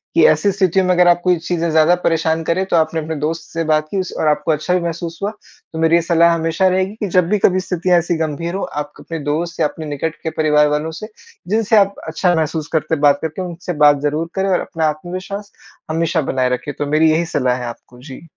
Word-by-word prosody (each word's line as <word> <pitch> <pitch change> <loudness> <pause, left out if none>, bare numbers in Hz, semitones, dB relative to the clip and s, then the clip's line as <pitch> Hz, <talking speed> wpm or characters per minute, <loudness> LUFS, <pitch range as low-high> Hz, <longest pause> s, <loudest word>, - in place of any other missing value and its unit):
कि - - +5
ऐसी 200 - +3
स्थितियों 190 -1 +1
में 185 - +2
अगर 180 0 +4
आप 175 0 +5
कोई 180 -1 +3
चीज़ें 170 0 -2
ज़्यादा 160 +2 +4
परेशान 165 0 +1
करें 170 +4 0
तो 190 - -1
आपने 160 0 +1
अपने 160 +1 -4
दोस्त 155 +2 -2
से 165 - -1
बात 155 0 +2
की 195 - -1
उस 185 - -3
और 155 - +1
आपको 150 +1 +1
अच्छा 155 +3 -1
भी 180 - +3
महसूस 170 0 -5
हुआ, 205 - 0 0.4
तो 160 - -5
मेरी 165 +1 +3
ये 170 - +4
सलाह 170 0 +3
हमेशा 165 +3 +1
रहेगी 190 +2 0
कि 210 - -2
जब 180 -2 +4
भी 210 - +2
कभी 185 -1 +3
स्थितियाँ 180 -1 +1
ऐसी 170 +1 -1
गंभीर 160 +2 -3
हों 195 - -2
आप 145 0 -5
क - - -13
अपने 165 -1 -6
दोस्त 165 +4 -2
या - - +3
अपने 155 +2 -9
निकट 150 +2 -3
के 160 - -1
परिवार 150 -1 +4
वालों 150 +2 -1
से, 165 +7 -8 0.4
जिनसे 220 +3 +2
आप 200 -1 +3
अच्छा 175 +3 +1
महसूस 160 -1 -2
करते 160 0 0
हैं 145 - -7
बात 145 -1 +4
करके 160 +3 -4
उनसे 175 0 -5
बात 145 -1 +5
ज़रूर 150 +3 -1
करें 195 0 0
और 185 - +2
अपना 165 -3 -3
आत्मविश्वास, 185 +6 -6 0.4
हमेशा 165 +1 0
बनाए 130 -1 +1
रखें, 125 +3 -3
तो 145 - -3
मेरी 155 +2 +3
यही 165 +2 +1
सलाह 130 -6 0
है 125 - -5
आपको। 120 +1 -10
जी। 130 0 -10
165 Hz, 245 wpm, -18 LUFS, 155-180 Hz, 0.4 s, कि